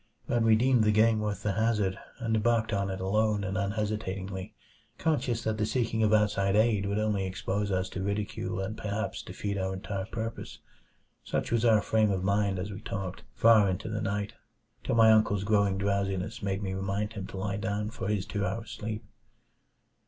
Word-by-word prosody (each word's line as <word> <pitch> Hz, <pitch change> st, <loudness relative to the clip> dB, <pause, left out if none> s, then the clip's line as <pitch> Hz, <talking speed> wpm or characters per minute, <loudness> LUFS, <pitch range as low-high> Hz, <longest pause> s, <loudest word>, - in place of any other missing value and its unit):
But 120 Hz, -, +1 dB
we 115 Hz, -1 st, +5 dB
deemed 125 Hz, 0 st, +3 dB
the 105 Hz, -, +4 dB
game 110 Hz, +1 st, +4 dB
worth 105 Hz, -1 st, -3 dB
the 105 Hz, -, +1 dB
hazard, 105 Hz, -2 st, +1 dB, 0.2 s
and 115 Hz, -3 st, -1 dB
embarked 110 Hz, 0 st, +1 dB
on 100 Hz, -1 st, 0 dB
it 95 Hz, 0 st, -4 dB
alone 105 Hz, +2 st, +1 dB
and 95 Hz, 0 st, -3 dB
unhesitatingly; 100 Hz, -2 st, -3 dB, 0.4 s
conscious 130 Hz, -7 st, 0 dB
that 110 Hz, 0 st, -1 dB
the 105 Hz, -, +2 dB
seeking 115 Hz, -3 st, 0 dB
of 110 Hz, -1 st, +3 dB
outside 105 Hz, -2 st, +3 dB
aid 105 Hz, -2 st, +3 dB
would 100 Hz, +1 st, -1 dB
only 105 Hz, -2 st, +1 dB
expose 100 Hz, +2 st, -2 dB
us 95 Hz, 0 st, 0 dB
to 95 Hz, -, -5 dB
ridicule 100 Hz, -1 st, -2 dB
and 100 Hz, +3 st, -3 dB
perhaps 105 Hz, +1 st, -3 dB
defeat 100 Hz, -1 st, -4 dB
our 95 Hz, 0 st, -1 dB
entire 95 Hz, 0 st, -4 dB
purpose. 115 Hz, 0 st, -5 dB, 0.7 s
Such -, -, -2 dB
was 115 Hz, -1 st, +2 dB
our 110 Hz, -2 st, +5 dB
frame 110 Hz, -1 st, +2 dB
of 95 Hz, -2 st, -1 dB
mind 100 Hz, 0 st, +1 dB
as 95 Hz, +3 st, -4 dB
we 100 Hz, +2 st, -7 dB
talked 95 Hz, -3 st, -5 dB
far 110 Hz, -3 st, +6 dB
into 95 Hz, +3 st, -3 dB
the 110 Hz, 0 st, -2 dB
night, 100 Hz, +1 st, -2 dB, 0.5 s
till -, -, 0 dB
my 110 Hz, -1 st, +7 dB
uncle's 105 Hz, -2 st, +3 dB
growing 100 Hz, -2 st, +2 dB
drowsiness 100 Hz, +2 st, -1 dB
made 100 Hz, 0 st, -2 dB
me 95 Hz, -1 st, -2 dB
remind 100 Hz, +3 st, -2 dB
him 100 Hz, -3 st, -5 dB
to -, -, -8 dB
lie 100 Hz, 0 st, -2 dB
down 105 Hz, +1 st, -2 dB
for 100 Hz, -5 st, -5 dB
his 100 Hz, -2 st, 0 dB
two 100 Hz, -1 st, -3 dB
hour 110 Hz, +4 st, -2 dB
sleep. 110 Hz, -1 st, -5 dB
105 Hz, 190 wpm, -29 LUFS, 100-110 Hz, 0.7 s, my